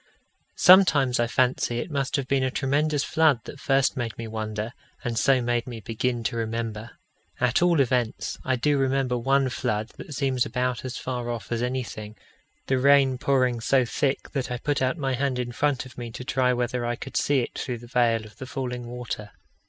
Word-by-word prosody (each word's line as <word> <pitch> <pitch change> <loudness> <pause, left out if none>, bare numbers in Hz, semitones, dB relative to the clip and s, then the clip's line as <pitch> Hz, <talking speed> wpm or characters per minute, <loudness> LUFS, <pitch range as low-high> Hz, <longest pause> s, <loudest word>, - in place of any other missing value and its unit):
Sometimes 150 -10 +6
I 120 - +2
fancy 125 -1 +1
it 120 - -4
must 140 -2 -1
have 140 -3 -2
been 140 0 +2
a 130 - +1
tremendous 145 +3 0
flood 155 -7 +3
that 140 - -10
first 135 -1 +2
made 120 -3 -3
me 115 - -5
wonder, 110 +1 -4 0.3
and 120 -3 -2
so 130 +3 +3
made 120 0 0
me 120 -2 -6
begin 115 +2 -2
to 115 - -2
remember. 115 -1 -4 0.4
At 125 +4 +2
all 175 -3 +4
events, 125 -3 0
I 130 - +1
do 145 +3 +1
remember 135 -1 +1
one 135 +2 +2
flood 110 -2 -2
that 150 - -8
seems 130 -3 +1
about 125 -1 -2
as 130 -1 -5
far 125 -2 -4
off 115 -4 -5
as 115 -1 0
anything 120 -4 -4 0.5
the 130 -1 +1
rain 135 -1 +4
pouring 130 -4 +1
so 130 +2 +3
thick 135 +3 -1
that 135 -3 -2
I 125 - -2
put 145 +2 -1
out 130 +5 +1
my 135 -4 -1
hand 135 0 0
in 125 -1 -3
front 135 0 0
of 130 -1 -12
me 120 -1 -5
to 125 - -6
try 130 -1 +1
whether 125 0 -1
I 120 0 -1
could 135 - -9
see 140 -2 +2
it - - -5
through 125 -2 -3
the 120 - -12
veil 120 -2 +1
of 105 - -15
the 130 - -7
falling 125 -1 -4
water. 120 -3 -6
125 Hz, 205 wpm, -25 LUFS, 120-135 Hz, 0.5 s, Sometimes